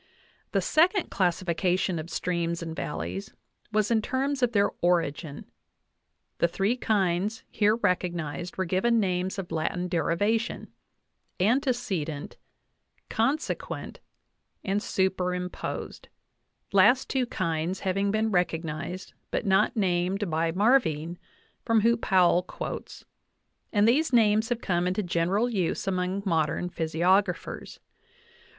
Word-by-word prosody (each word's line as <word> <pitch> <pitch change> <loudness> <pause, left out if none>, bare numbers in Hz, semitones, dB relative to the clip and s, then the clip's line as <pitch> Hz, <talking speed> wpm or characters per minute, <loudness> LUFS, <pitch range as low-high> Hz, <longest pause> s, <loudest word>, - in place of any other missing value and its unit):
The - - +1
second 360 +4 +2
classification 180 -1 0
of 155 +2 -7
streams 170 -1 -2
and 165 -1 -5
valleys 90 - -5 0.4
was 215 +1 +1
in 225 -1 +3
terms 270 +4 -1
of 245 -2 +3
their 205 -3 +2
origin; 165 -4 0 0.9
the 170 - +4
three 195 +7 0
kinds 205 -2 0
here 210 0 +3
recognized 175 -5 -2
were 190 - 0
given 210 +7 +2
names 185 -1 -1
of 190 -3 -5
Latin 170 +3 -1
derivation 205 +6 -1 0.7
antecedent, 200 - 0 0.7
consequent, 270 +8 -2 0.6
and 200 +1 0
superimposed 180 -2 -2 0.7
last 210 +7 +5
two 260 -2 0
kinds 170 -1 -2
having 195 +1 0
been 215 +1 +1
recognized 170 0 -2 0.2
but - - -2
not 195 +3 +3
named 185 0 0
by 165 +1 +1
Mar 220 +10 +5
vine, 165 - -4 0.4
from 230 -2 +3
whom 230 +1 +3
Powell 180 -4 +4
quotes; 180 - -7 0.7
and 205 0 +3
these 290 +7 +3
names 220 -2 +4
have 240 -1 -1
come 175 -1 0
into 185 +3 0
general 180 +6 +1
use 195 -8 -1
among 185 +1 -1
modern 170 0 0
physiographers. 175 +4 0
185 Hz, 115 wpm, -27 LUFS, 170-215 Hz, 0.9 s, last